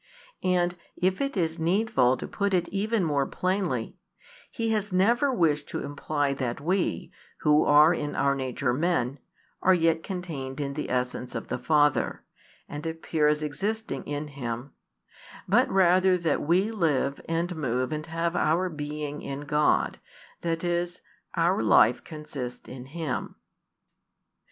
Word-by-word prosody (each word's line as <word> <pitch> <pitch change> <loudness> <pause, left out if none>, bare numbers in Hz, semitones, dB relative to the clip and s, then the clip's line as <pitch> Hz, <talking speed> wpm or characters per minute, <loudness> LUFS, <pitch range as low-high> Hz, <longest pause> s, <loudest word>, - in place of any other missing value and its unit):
And, 180 -1 +1 0.2
if 185 +4 0
it 275 -5 -1
is 165 -2 0
needful 165 - +2
to - - -6
put 200 -1 0
it 175 -1 +1
even 210 +1 0
more 145 -4 +1
plainly, 190 +2 -1 0.5
he 225 -1 -2
has 210 -2 -1
never 235 +10 +3
wished 155 - +1
to - - -3
imply 145 0 -1
that 130 -2 -3
we, 180 +5 -1 0.3
who 150 0 +4
are 150 +3 +7
in 150 -3 -3
our 140 0 +2
nature 130 -1 -1
men, 140 -3 0 0.4
are 185 - +5
yet 165 -1 +2
contained 155 -8 -5
in 140 -1 -2
the 150 - -4
essence 125 0 -2
of - - -5
the - - -2
Father, 145 - +2 0.4
and 145 +2 -6
appear 160 -1 0
as 150 0 +1
existing 200 0 -3
in 145 +1 -4
Him; 125 -1 -5 0.8
but - - +4
rather 185 0 +4
that 165 -4 0
we 185 +8 +2
live 150 -9 0
and 170 +2 -1
move 130 -3 -1
and 155 +1 -4
have 165 +1 -1
our 175 +4 +2
being 150 -1 -5
in 140 +1 -5
God, 150 +1 +1 0.4
that 165 0 -2
is, 175 0 -1 0.3
our 170 -1 +2
life 110 +2 +5
consists 150 -5 -7
in 125 -1 -8
Him. 155 -2 -4
155 Hz, 145 wpm, -27 LUFS, 140-180 Hz, 0.8 s, are